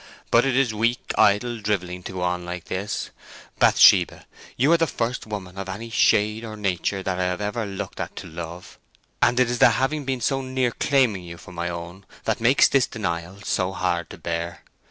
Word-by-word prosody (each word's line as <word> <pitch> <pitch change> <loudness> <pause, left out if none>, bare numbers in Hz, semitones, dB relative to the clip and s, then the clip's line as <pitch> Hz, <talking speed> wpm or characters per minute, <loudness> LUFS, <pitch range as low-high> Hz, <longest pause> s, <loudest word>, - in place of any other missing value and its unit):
But 120 +2 +5
it 130 -2 +1
is 130 -5 +2
weak, 115 +3 -1
idle 115 +4 +3
drivelling 90 -4 -2
to - - -6
go 90 - -4
on 90 0 -1
like 90 0 -6
this.... 100 +3 -4 0.5
Bathsheba, - - +5 0.3
you 140 +6 +3
are 170 - +6
the 165 0 +2
first 120 -3 -3
woman 95 -3 -6
of 95 0 -5
any 115 +5 -6
shade 105 +1 +3
or 110 -2 -7
nature 95 -1 -1
that 95 -1 -2
I 90 - +1
have 90 0 -1
ever 105 +2 -2
looked 95 -1 -6
at - - -5
to - - -7
love, 85 +2 -8 0.4
and 120 +1 +3
it 125 - +4
is 120 0 -2
the - - +8
having 135 +6 0
been 135 -1 -2
so 135 +4 0
near 130 -2 0
claiming 125 -8 +2
you 85 -1 -9
for 95 - -13
my 85 -1 -3
own 85 +3 -8 0.2
that - - -1
makes 120 +4 +5
this 135 -2 +2
denial 90 -2 -4
so 95 0 -1
hard 85 -2 -1
to - - -10
bear. 85 0 -4
105 Hz, 205 wpm, -24 LUFS, 90-120 Hz, 0.5 s, the